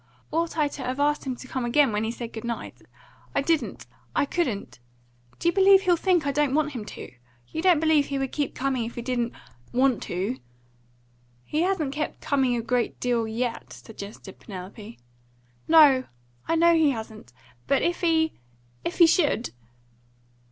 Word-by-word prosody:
Ought 330 +1 -1
I 300 -2 +3
to 285 - -8
have 255 +1 -3
asked 295 -1 +1
him 260 - -2
to 255 - -11
come 260 0 -3
again, 260 +2 +3
when 210 +1 -1
he 220 - -1
said 235 0 -6
good 220 - -6
night? 235 -1 -4 0.6
I 280 - +2
didn't; 325 +1 -1 0.3
I - - +3
couldn't. 255 - -2 0.6
Do - - -2
you 340 - +4
believe 390 0 +6
he'll 360 -3 +4
think 350 -2 +1
I 280 - +1
don't 285 -1 +1
want 300 -1 +1
him 235 -6 -6
to? - - -9 0.4
You 320 - -4
don't 355 -3 +5
believe 315 -2 +3
he 280 - -2
would 270 -1 -2
keep 290 -2 -2
coming 260 -3 -1
if 230 - -7
he 240 - -5
didn't 240 -1 -1 0.4
want 255 -1 +2
to 195 +8 -2 0.5
" 120 0 -36
"He 305 - -1
hasn't 345 -7 0
kept 305 +1 -3
coming 265 -3 +1
a 235 - -2
great 245 0 -1
deal, 240 -2 0
yet," 235 +1 -3
suggested 200 -3 -10
Penelope. 200 +3 -9 0.7
"No; 290 -5 +6 0.4
I 330 - +2
know 340 +1 +5
he 320 -3 +4
hasn't. 220 - -6 0.4
But 275 - +2
if 345 +1 0
he 320 -2 +2 0.5
if 350 - -3
he 345 - +8
should?" 310 - +2
270 Hz, 180 wpm, -25 LUFS, 230-320 Hz, 0.7 s, he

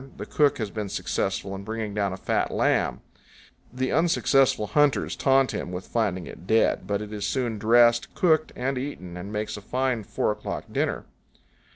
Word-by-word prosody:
The - - -5
cook 145 -2 +2
has 110 -4 -3
been 105 -2 -4
successful 95 +1 -2
in 95 0 -6
bringing 110 0 -4
down 100 -2 0
a 95 - -5
fat - - 0
lamb. - - +1 0.7
The 130 +2 -2
unsuccessful 135 -7 +3
hunters 140 +7 +2
taunt 135 -1 +3
him 90 - -4
with 90 +1 -5
finding 100 -6 -1
it 90 - -11
dead; 110 0 +2
but 100 0 -1
it 105 0 -8
is 105 -1 -4
soon 115 0 -1
dressed, 120 +2 +4
cooked, 160 -3 +2
and 130 +1 -1
eaten, 90 -11 -6
and 95 +3 -7
makes 105 0 -3
a - - -8
fine 125 +1 -1
four 105 - -1
o'clock 105 0 -5
dinner. - - -1
110 Hz, 180 wpm, -25 LUFS, 100-130 Hz, 0.7 s, dressed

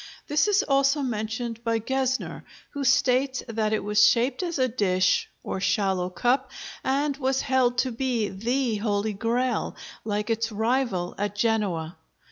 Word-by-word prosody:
This 300 +7 +2
is 410 -1 +3
also 275 +1 +2
mentioned 230 0 -3
by 230 -1 +1
Gesner, 265 +3 -2 0.3
who 285 -1 -4
states 260 0 +2
that 220 -2 -1
it 215 - 0
was 210 0 +3
shaped 245 +7 +3
as 345 -3 -2
a 260 -1 +2
dish, 185 -6 +1
or - - -3
shallow 190 -3 +1
cup, 250 +8 0 0.3
and 280 +2 0
was 265 -1 0
held 255 -2 +2
to 260 +1 +1
be 235 -3 -1
the 235 +4 -1
Holy 205 0 -1
Grail, 235 +4 -1 0.3
like 210 +1 -2
its 225 0 -1
rival 220 -4 0
at 205 0 -2
Genoa. 205 -7 0
235 Hz, 150 wpm, -26 LUFS, 210-265 Hz, 0.3 s, is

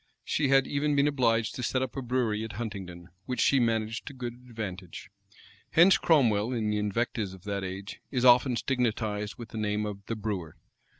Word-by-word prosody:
She 150 - 0
had 135 0 +5
even 145 +1 0
been 140 +1 +4
obliged 115 -5 +1
to - - -5
set 130 +2 0
up 130 - -5
a 135 - -3
brewery 120 -4 0
at 110 -1 -6
Huntingdon, 95 -5 -6 0.2
which 125 - -3
she 140 - +4
managed 115 -1 0
to 145 - -6
good 125 -2 -5 0.2
advantage. 100 -6 -7 0.6
Hence 175 +4 +6
Cromwell, 120 -8 +3
in 110 -3 0
the 105 - 0
invectives 105 -1 -1
of 95 - -17
that 100 -1 -3
age, 95 +2 -6
is 125 -2 0
often 125 +1 +6
stigmatized 110 -5 -1
with 120 -1 -9
the 110 - -6
name 105 0 0
of 100 -1 -6
the 115 - -2
brewer. 100 -7 -4
115 Hz, 190 wpm, -28 LUFS, 105-125 Hz, 0.6 s, Hence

